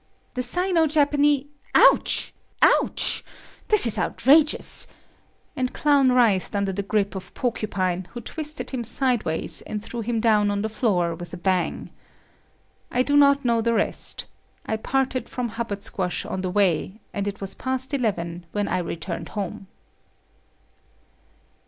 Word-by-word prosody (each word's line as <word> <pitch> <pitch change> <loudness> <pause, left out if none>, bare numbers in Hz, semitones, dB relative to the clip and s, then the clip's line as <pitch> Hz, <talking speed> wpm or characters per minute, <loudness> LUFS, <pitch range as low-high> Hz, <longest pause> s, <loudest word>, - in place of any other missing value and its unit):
"The 250 - -2
Sino 345 +5 +1
Japane……ouch!……ouch! 290 -1 +3 0.4
This 425 -8 +5
is 230 - +2
outrageous," 300 +3 +2 0.7
and 255 -1 -2
Clown 285 -3 +3
writhed 225 -7 +2
under 200 -1 -1
the 200 - -2
grip 200 0 -1
of 190 -2 -8
Porcupine 190 -7 -2
who 240 - -6
twisted 305 +5 -5
him 255 -3 -3
sideways 235 - +2
and 210 0 -6
threw 240 - -6
him 230 +1 -2
down 215 -2 +3
on 205 0 -1
the 220 - -2
floor 190 -7 0
with 175 0 -10
a - - -9
bang. 185 0 -1 1.0
I 250 - +1
do 285 +2 0
not 280 -1 +4
know 235 -1 +2
the 230 +1 +1
rest. 205 - 0 0.4
I 220 - -2
parted 260 +2 -2
from 245 -1 -3
Hubbard 220 -3 -5
Squash 180 -2 -3
on 190 - -4
the 185 - -2
way, 190 +1 0
and 200 -1 -3
it 200 0 -5
was 195 -1 -1
past 260 +1 -3
eleven 175 -9 -2
when 205 -1 -1
I 185 - -1
returned 170 0 -5
home. 195 -1 -6
220 Hz, 140 wpm, -23 LUFS, 195-260 Hz, 1.0 s, This